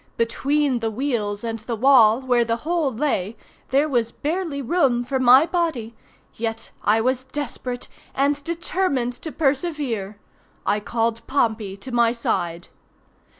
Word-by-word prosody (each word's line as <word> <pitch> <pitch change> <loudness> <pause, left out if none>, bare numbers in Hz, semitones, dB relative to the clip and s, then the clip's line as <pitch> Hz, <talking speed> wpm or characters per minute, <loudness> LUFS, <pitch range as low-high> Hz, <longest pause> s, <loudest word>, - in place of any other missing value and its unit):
Between 270 +3 +1
the 225 -1 -1
wheels 220 -4 -2
and 225 -1 -3
the 230 +2 -4
wall 235 -1 +5
where 245 -2 +2
the 230 0 0
hole 330 -4 +1
lay 225 -5 -1 0.3
there 280 +4 +3
was 240 -5 0
barely 315 0 -3
room 265 -3 +2
for 265 +1 -1
my 260 +4 +7
body—yet 235 -8 -4
I 215 +2 +3
was 255 +2 0
desperate, 255 -3 -4 0.3
and 285 +1 +1
determined 335 -6 -1
to 315 - -5
persevere. 270 - -1 0.5
I 205 - +2
called 230 +1 -1
Pompey 220 -7 0
to 255 +6 -9
my 235 -1 +3
side. 175 -7 -2
245 Hz, 135 wpm, -23 LUFS, 225-285 Hz, 0.5 s, my